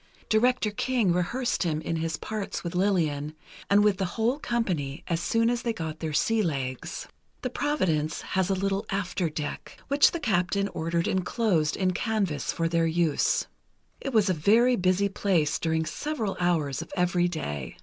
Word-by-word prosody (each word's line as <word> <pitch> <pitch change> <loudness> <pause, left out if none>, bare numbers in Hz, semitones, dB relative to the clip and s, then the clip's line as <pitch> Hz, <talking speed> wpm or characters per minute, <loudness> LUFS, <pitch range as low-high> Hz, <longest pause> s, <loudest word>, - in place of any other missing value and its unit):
Director 225 0 +3
King 225 -4 +1
rehearsed 235 +8 0
him 160 -4 0
in 165 +1 -2
his 160 -1 -2
parts 210 -2 -4
with 170 -1 -4
Lillian, 160 -6 0 0.3
and 205 +1 +5
with 210 -2 +3
the 190 - 0
whole 240 +6 +1
company, 175 - -2
as 170 -2 0
soon 230 +5 +2
as 240 0 +1
they 235 -2 -1
got 160 -5 -5
their 160 -1 -3
sea 225 +9 +2
legs. 135 -8 -3 0.4
The 255 - -2
Providence 170 - 0
has 190 0 0
a 195 - +2
little 195 +1 -1
after 185 -3 -1
deck, 150 -1 -6
which 280 +1 +6
the 340 - -4
captain 200 - +1
ordered 165 0 -1
enclosed 185 -4 +1
in 185 -1 +2
canvas 190 - -1
for 165 - -1
their 165 0 +2
use. 165 -2 +1 0.5
It 275 - -4
was 215 -4 +3
a 185 - +3
very 225 +10 +4
busy 185 0 +2
place 185 -6 +1
during 160 -1 0
several 235 - -3
hours 160 -6 +1
of 165 - -9
every 180 0 +2
day. 75 - -5
185 Hz, 170 wpm, -27 LUFS, 160-215 Hz, 0.5 s, which